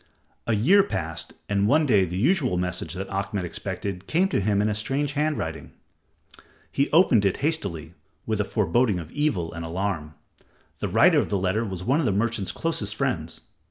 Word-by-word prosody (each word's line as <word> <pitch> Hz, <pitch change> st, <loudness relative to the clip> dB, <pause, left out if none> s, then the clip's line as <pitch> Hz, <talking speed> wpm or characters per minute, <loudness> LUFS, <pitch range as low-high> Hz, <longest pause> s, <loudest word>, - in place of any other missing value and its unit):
A 115 Hz, -, +2 dB
year 170 Hz, -, +5 dB
passed, 80 Hz, -, -4 dB
and 100 Hz, 0 st, +1 dB
one 150 Hz, +6 st, +4 dB
day 105 Hz, -8 st, +4 dB
the 90 Hz, +1 st, -5 dB
usual 130 Hz, -, +2 dB
message 90 Hz, -2 st, -3 dB
that 95 Hz, +1 st, -4 dB
Ahmed 100 Hz, 0 st, -2 dB
expected 95 Hz, +1 st, -5 dB
came 185 Hz, +4 st, +2 dB
to -, -, +1 dB
him 100 Hz, +1 st, +1 dB
in 105 Hz, -, +2 dB
a 105 Hz, -, 0 dB
strange 135 Hz, +7 st, -1 dB
hand 150 Hz, +1 st, 0 dB
writing. 80 Hz, 0 st, -5 dB, 1.0 s
He 140 Hz, -, +1 dB
opened 150 Hz, -, +5 dB
it 100 Hz, -2 st, +1 dB
hastily, 100 Hz, -, -2 dB, 0.3 s
with 110 Hz, -2 st, 0 dB
a -, -, +1 dB
foreboding 105 Hz, +1 st, +1 dB
of 85 Hz, -1 st, -7 dB
evil 105 Hz, -, -1 dB
and 85 Hz, 0 st, -6 dB
alarm. 85 Hz, -3 st, -3 dB, 0.6 s
The -, -, -1 dB
writer -, -, +5 dB
of -, -, -1 dB
the 100 Hz, -, +1 dB
letter 95 Hz, +4 st, 0 dB
was 95 Hz, -5 st, -5 dB
one 135 Hz, +9 st, +2 dB
of 160 Hz, -, +1 dB
the -, -, +2 dB
merchant's 105 Hz, 0 st, 0 dB
closest 105 Hz, -11 st, -2 dB
friends. -, -, -2 dB
100 Hz, 190 wpm, -25 LUFS, 90-135 Hz, 1.0 s, year